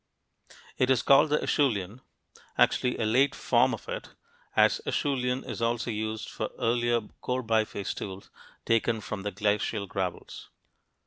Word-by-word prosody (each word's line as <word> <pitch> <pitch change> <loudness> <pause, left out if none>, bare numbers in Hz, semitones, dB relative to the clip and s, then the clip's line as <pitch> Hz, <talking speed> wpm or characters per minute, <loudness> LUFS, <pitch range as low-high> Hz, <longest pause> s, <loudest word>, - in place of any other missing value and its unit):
It 130 - +3
is 130 -2 +3
called 145 +3 +6
the 150 - +2
Acheulean, 115 - 0 0.6
actually 125 -1 +3
a 115 - -1
late 130 +6 +3
form - - +3
of - - -6
it, - - -6 0.4
as - - +4
"Acheulean" 130 -3 0
is - - -5
also 115 0 0
used 110 0 -3
for - - -4
earlier 120 0 +1 0.2
core 125 0 -2
biface 110 -3 0
tools 95 -1 -8 0.3
taken 115 0 +2
from 105 -1 -5
the 105 +1 -3
glacial 105 0 0
gravels. 95 -2 -5
115 Hz, 140 wpm, -28 LUFS, 105-125 Hz, 0.6 s, called